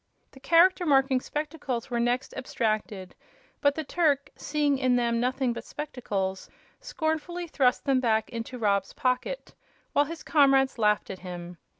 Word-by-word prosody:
The 265 - -15
Character 345 +5 +4
Marking 270 -4 +3
Spectacles 285 -5 -4
were 240 - 0
next 245 +2 0
abstracted, 215 -7 -2 0.5
but 285 0 +3
the 315 - -3
Turk, 285 -3 +1
seeing 290 -2 0
in 255 -2 +2
them 235 -1 +1
nothing 255 0 0
but - - -7
spectacles, 205 -10 -4 0.3
scornfully 345 -5 -3
thrust 265 -6 +1
them 270 -2 +3
back 220 -3 +1
into 235 +2 -5
Rob's 200 -4 0
pocket, 260 - -2 0.4
while 290 - +4
his 330 +2 -8
comrades 270 -4 +3
laughed 210 -1 +2
at 190 - -8
him. 175 -1 -8
260 Hz, 150 wpm, -27 LUFS, 230-295 Hz, 0.5 s, Character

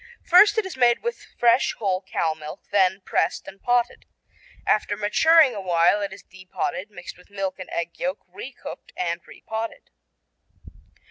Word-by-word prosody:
First 410 +5 +6
it 440 - +2
is 380 - -6
made 245 -2 +3
with 475 0 -4
fresh 240 +2 +3
whole 190 -3 0
cow 165 -4 -1
milk, 155 -1 -9
then 190 -1 +3
pressed - - 0
and 195 - -11
potted. 245 0 0 0.6
After 205 -1 +1
maturing 290 +7 +5
a 205 - -5
while 175 +2 +3
it 200 -1 -3
is 190 - -11
de 190 0 -15
potted, 185 +2 -3
mixed 180 -3 -10
with 180 - -20
milk 195 -2 -4
and 185 - -8
egg 170 0 -4
yolk, 185 +3 -3
re 255 - -7
cooked 245 - -10
and 170 -1 -2
re - - -15
potted. 225 +1 -5
200 Hz, 175 wpm, -24 LUFS, 185-245 Hz, 0.6 s, First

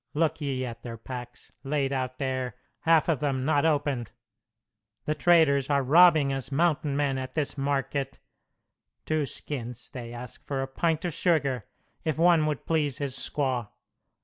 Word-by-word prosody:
Look 160 0 +1
ye 135 -3 -1
at 115 -2 -7
their 115 -2 -7
packs, 125 +1 -9
laid 140 -1 0
out 130 -1 -2
there, 130 -3 -2 0.2
half 165 -1 +4
of 160 -6 +1
them 135 -2 -1
not 150 +1 +3
opened! 140 -6 0 1.0
The 155 - +1
traders 150 -4 +4
are 140 -1 +2
robbing 155 -1 +6
us 135 0 -4
mountain 150 -1 +1
men 140 -2 +1
at 130 0 -6
this 150 -3 -1
market. 135 -1 -1 0.9
Two 155 -2 0
skins 120 -6 -6
they 120 -3 -7
ask 120 0 -9
for 135 -2 -1
a - - -4
pint 160 +5 0
of 175 - -1
sugar, 140 - +1 0.4
if 155 -2 -1
one 165 -2 +4
would 150 -3 -3
please 150 -5 0
his 140 -3 -3
squaw. 130 -6 -1
140 Hz, 160 wpm, -27 LUFS, 130-155 Hz, 1.0 s, robbing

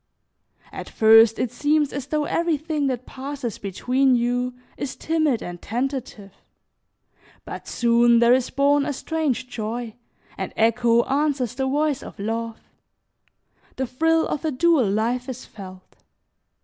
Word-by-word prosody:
At - - -8
first 225 0 +6
it 245 - -1
seems 295 +3 +1
as 280 -1 -5
though 300 0 -1
everything 310 -3 -1
that 255 -1 -3
passes 270 -3 -6
between 250 +7 +1
you 245 +1 -1 0.2
is 280 - -5
timid 310 -7 0
and 175 -1 -7
tentative, 240 -5 -4 1.1
but - - -8
soon 235 0 +3
there 235 +1 +5
is 255 -1 +1
born 285 +1 +2
a 290 - -2
strange 290 -3 -2
joy, 230 -1 -5 0.5
and - - -4
echo 230 +1 +3
answers 275 -4 0
the 265 +1 -2
voice 290 0 0
of - - -11
love; 225 +2 -4 1.2
the 265 - -2
thrill 320 +6 +1
of 300 - -3
a 320 - 0
dual 295 - +2
life 235 +5 -1
is 255 -1 -7
felt. 185 -3 -12
250 Hz, 135 wpm, -23 LUFS, 230-285 Hz, 1.2 s, first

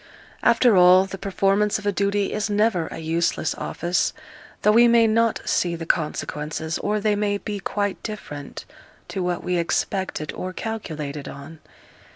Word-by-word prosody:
After 235 -1 +4
all, 180 +1 +7
the 195 0 -8
performance 200 +1 +1
of 210 - -10
a 205 - +2
duty 200 0 0
is 210 +1 -1
never 205 -5 +1
a - - -8
useless 165 0 0
office, 175 +1 -1 0.5
though 210 - +5
we 235 +2 +6
may 235 -1 +5
not 230 0 +2
see 175 -1 +1
the 165 0 -6
consequences, 155 0 -2
or 210 +1 0
they 210 0 +1
may 205 0 0
be 205 0 -5
quite 205 0 -2
different 150 -10 -7 0.4
to 190 - -3
what 180 -1 -2
we 180 -1 0
expected 170 -2 -2
or 185 0 -5
calculated 155 -11 -5
on. 140 +3 -10
195 Hz, 160 wpm, -23 LUFS, 165-210 Hz, 0.5 s, all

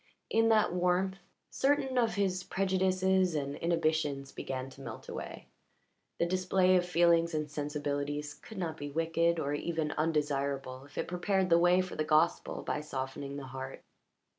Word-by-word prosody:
In 225 0 +4
that 215 -5 +4
warmth 180 +2 +1 0.3
certain 270 -1 +1
of 235 -3 +2
his 190 -2 0
prejudices 190 -1 +1
and 140 -1 -2
inhibitions 155 -5 0
began 130 -1 -4
to 135 - -13
melt - - -8
away; - - -7 0.7
the - - +2
display 185 +1 +3
of 180 -1 +2
feelings 170 -1 +3
and 150 -1 -2
sensibilities 145 0 -3
could 220 +8 -12
not 165 -4 -3
be 145 -1 -5
wicked 165 +2 +1
or 145 -2 -1
even 160 0 -1
undesirable 140 -4 -1
if 145 - -17
it - - -1
prepared 185 +1 0
the 170 - +7
way 175 +1 +5
for 185 - -6
the 155 - 0
gospel 155 +2 +1
by 150 - -2
softening 140 -1 -5
the 140 - -6
heart. 130 0 -7
165 Hz, 160 wpm, -31 LUFS, 145-185 Hz, 0.7 s, the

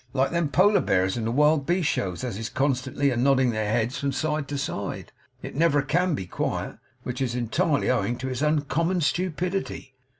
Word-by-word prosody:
Like 135 0 +1
them 170 -3 0
Polar 200 +7 +4
bears 95 0 +1
in 115 -2 -3
the 115 - 0
wild 150 +2 +3
beast 175 -2 +1
shows 95 - -2
as 125 -5 -3
is 110 +2 -4
constantly 135 +1 0
a - - -1
nodding 130 0 +3
their 110 -2 -1
heads 115 +3 0
from 140 0 -1
side 150 +1 -1
to 145 - -3
side, 135 - -4 0.3
it - - -6
never 145 -2 +3
CAN 175 +4 +1
be 95 - -5
quiet. - - -3 0.2
Which 125 +1 -4
is 125 -2 -1
entirely 125 +5 +1
owing 120 -1 0
to 130 +1 -4
its 130 0 -3
uncommon 155 +4 +1
stupidity. 180 -3 -2
140 Hz, 195 wpm, -25 LUFS, 120-155 Hz, 0.3 s, Polar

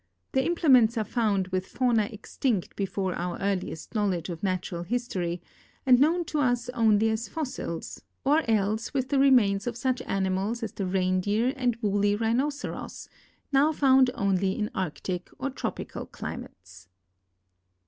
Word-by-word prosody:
Their 265 - +2
im 345 - +1
plements 255 -8 +5
are 220 - +1
found 205 -5 0
Avith 185 0 -1
fauna 235 -5 +1
extinct 215 -1 -2
before 195 -1 -2
our 175 0 -3
earliest 195 -5 -3
knowl 205 -4 +1
edge 170 +1 -5
of 170 -2 -5
natural 185 -2 -2
history 180 -5 -2 0.4
and 250 -2 +6
known 335 +5 +3
to 310 -2 -2
us 245 -3 +1
only 225 -2 +3
as 220 +2 -2
fossils, 260 - -5 0.2
or 295 +4 +4
else 215 +4 0
with 260 -1 0
the 280 - +2
remains 240 -7 +4
of 240 -1 -3
such 255 +1 0
animals 195 +4 -1
as 220 - -3
the 195 - -3
reindeer 190 +6 +1
and 250 -3 0
woolly 205 0 +2
rhinoceros, 250 +7 -2 0.4
now 285 +3 +4
found 265 -3 +5
only 195 -1 +1
in 210 -1 -2
arctic 180 +1 -3
or 275 +1 -3
tropical 255 - -5
climates. 90 0 -9
215 Hz, 150 wpm, -27 LUFS, 190-255 Hz, 0.4 s, and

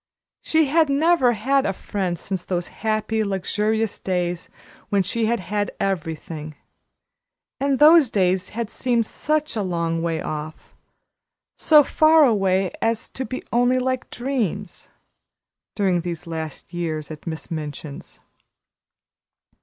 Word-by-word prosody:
She 315 -1 +2
had 310 +2 +3
never 280 -3 +3
had 270 +5 +1
a 195 - 0
friend 185 -2 -3
since 185 +1 -4
those 175 -2 -3
happy, 220 0 -1
luxurious 210 +2 -1
days 180 -2 -2 0.4
when 200 -1 +2
she 220 +4 -1
had 235 +1 +1
had 205 +2 -2
everything; 160 -4 -3 1.0
and 275 -1 +1
those 305 -2 +7
days 185 -3 +1
had 230 0 -4
seemed 240 -3 +1
such 305 +4 -1
a 215 - 0
long 170 -3 -1
way 165 -1 -1
off 155 0 -6 0.8
so 305 -2 +6
far 310 +1 +5
away 195 -5 +2
as 225 0 -1
to 260 - -4
be 255 - -5
only 245 +2 +3
like 255 0 -1
dreams 240 - -3 0.9
during 190 -4 +1
these 170 -1 -5
last 160 0 -6
years 160 -3 -3
at 155 +2 -10
Miss 160 +2 -6
Minchin's. 150 -2 -7
205 Hz, 130 wpm, -23 LUFS, 175-250 Hz, 1.0 s, those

